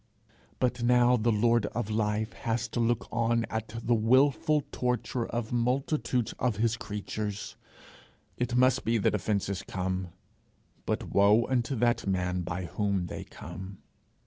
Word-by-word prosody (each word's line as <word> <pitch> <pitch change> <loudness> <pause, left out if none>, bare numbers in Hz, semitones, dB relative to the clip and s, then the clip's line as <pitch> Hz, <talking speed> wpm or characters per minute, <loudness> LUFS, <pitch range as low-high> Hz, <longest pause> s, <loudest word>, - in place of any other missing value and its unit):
But 125 -1 0
now 125 +1 +5
the 115 0 +2
lord 115 0 +3
of 110 -1 -3
life 105 0 0
has 115 0 -2
to - - -3
look 120 0 +1
on 115 0 +1
at 110 0 -2 0.2
the 120 - +2
wilful 135 +6 +3
torture 125 -1 -1
of 115 -1 -3
multitudes 125 0 0
of 120 -3 +1
his 115 +2 +1
creatures. 105 -1 -5 0.8
It 125 0 -2
must 130 +1 +4
be 115 +1 +2
that 105 - +2
offences 100 -2 -1
come, 95 0 -3 0.8
but - - -2
woe 105 +4 +5
unto 130 +1 0
that 120 -2 +1
man 90 -1 0
by 90 +1 -4
whom 100 +2 -1
they - - -6
come! 95 +3 -9
115 Hz, 145 wpm, -29 LUFS, 100-120 Hz, 0.8 s, now